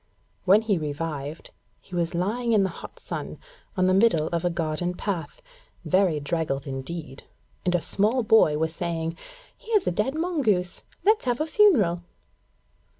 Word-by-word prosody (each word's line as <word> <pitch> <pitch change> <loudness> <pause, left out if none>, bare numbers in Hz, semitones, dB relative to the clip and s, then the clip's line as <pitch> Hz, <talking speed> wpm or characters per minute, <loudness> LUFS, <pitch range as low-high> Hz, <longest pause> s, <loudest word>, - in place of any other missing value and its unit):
When 200 +4 +5
he 205 -5 +1
revived, 150 0 -5 0.3
he 185 - -18
was 170 -1 -1
lying 230 +7 0
in 210 -3 +4
the 190 - 0
hot 170 - -10
sun - - -6 0.4
on 185 - +3
the 185 - +3
middle 190 -6 +3
of 170 0 -2
a 175 - +2
garden 170 +1 -2
path, 200 - -4 0.4
very 185 -5 +2
draggled 145 -2 -2
indeed, 135 +1 -6 0.4
and 180 0 +2
a 175 - 0
small 225 +5 +1
boy 215 -9 +5
was 160 +1 -1
saying: 165 -1 -3 0.4
'Here's 430 -4 0
a - - +1
dead 210 - -1
mongoose. 260 - 0 0.2
Let's 430 -4 +3
have 245 -1 0
a 310 - +1
funeral.' 280 - +4
180 Hz, 155 wpm, -25 LUFS, 160-220 Hz, 0.4 s, When